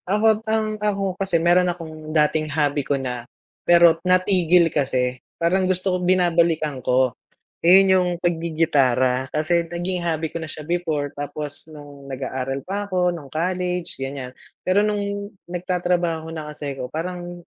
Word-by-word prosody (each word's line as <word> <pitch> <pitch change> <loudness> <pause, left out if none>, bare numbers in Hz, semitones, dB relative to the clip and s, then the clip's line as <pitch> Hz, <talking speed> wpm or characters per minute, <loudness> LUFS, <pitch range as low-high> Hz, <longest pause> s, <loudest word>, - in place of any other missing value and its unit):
Ako't 215 +2 +3
ang 220 0 +1
ako 200 -2 0
kasi 195 -2 0
mayro'n 175 +2 +3
akong 160 -3 -7
dating 155 0 +1
hobby 145 -1 +1
ko 140 +1 -1
na 125 -2 -5 0.3
pero 170 -1 +5
natigil 180 -2 +4
kasi 130 -3 0 0.2
parang 185 +2 +2
gusto 185 0 0
ko - - +1
binabalikan 170 -5 +2
ko. 125 0 +2 0.5
Ayun, 190 +2 +7
yung 180 -1 +2
paggigitara 140 -7 +1
kasi 170 +3 +1
naging 175 +1 -2
hobby 160 -1 -1
ko - - -9
na 160 - -6
siya 150 - -7
before 160 -5 -1
tapos 145 0 -6
nung 145 -2 -12
nag-aaral 130 0 -3
pa 200 +2 -3
'ko 180 -1 +2
nung 160 -6 -5
college, 180 +1 -2
ganyan, 135 -1 -6 0.2
pero 195 +3 +2
nung 210 -1 0 0.5
nagtatrabaho 175 -2 -1
na 155 -2 -6
kasi 145 -2 -6
ko 125 -1 -6
parang 175 +2 -5
165 Hz, 145 wpm, -22 LUFS, 145-180 Hz, 0.5 s, Ayun